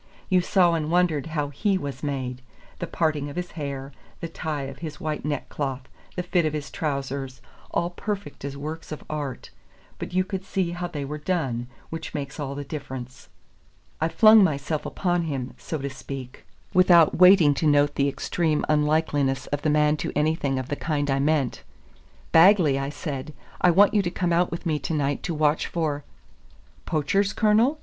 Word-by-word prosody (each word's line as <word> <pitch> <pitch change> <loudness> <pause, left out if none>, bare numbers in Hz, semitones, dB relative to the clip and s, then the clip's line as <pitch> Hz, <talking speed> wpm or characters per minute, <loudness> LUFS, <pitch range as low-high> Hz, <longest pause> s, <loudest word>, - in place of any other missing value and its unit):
You 185 -2 +4
saw 175 -1 +3
and 155 -2 -1
wondered 165 -4 +2
how 150 -3 -2
he 195 +8 0
was 140 -6 -5
made: 130 -3 -3 0.4
the - - -3
parting 155 -3 0
of 140 - -9
his 180 0 -4
hair, 140 -3 -5 0.3
the 170 - -4
tie 155 -3 -4
of 135 0 -7
his 155 -3 -7
white 155 -1 -3
neckcloth, 140 -2 -3 0.3
the 180 - -2
fit 180 -1 +1
of 155 -1 0
his 150 -2 -4
trousers, 140 -3 -3 0.3
all 170 +1 -1
perfect 205 -1 -5
as 140 0 -5
works 155 +3 -6
of 155 - -6
art; 145 -4 -5 0.5
but - - -5
you 185 +1 +2
could 190 0 -5
see 190 -2 -1
how 175 0 -3
they 150 -5 -5
were 150 +2 -5
done, 135 -8 -1 0.2
which 165 0 -6
makes 140 0 -5
all 140 -1 -3
the 145 - -4
difference. 130 -4 -8 0.7
I 160 - +3
flung 215 +2 +7
myself 150 -2 -1
upon 175 -2 0
him, 135 -5 -4
so 160 - -4
to 140 -1 -4
speak, 130 -1 -8 0.3
without 175 -4 +5
waiting 180 -5 +7
to 155 +3 0
note 145 0 +4
the 140 0 +1
extreme 155 +2 0
unlikeness 150 -3 +1
of 145 - -1
the 155 - +1
man 150 0 +3
to - - -3
anything 150 -2 +1
of 130 0 -4
the 145 - -1
kind 145 -2 -1
I 135 - +1
meant. 145 -3 +1 0.7
"Bagley," 165 -5 +6
I 135 0 -2
said, 145 -1 -5 0.3
"I 180 - +6
want 195 +4 +5
you 210 - +4
to 180 - -1
come 175 -1 -1
out 175 +1 +3
with 170 - -6
me 155 -3 0
to 155 +4 -2
night 145 -1 0
to 170 - -3
watch 150 0 +2
for 150 -4 -2 0.4
" - - -29
"Poachers, 195 +7 +1
Colonel?" 225 +7 +3
150 Hz, 190 wpm, -25 LUFS, 140-175 Hz, 0.7 s, flung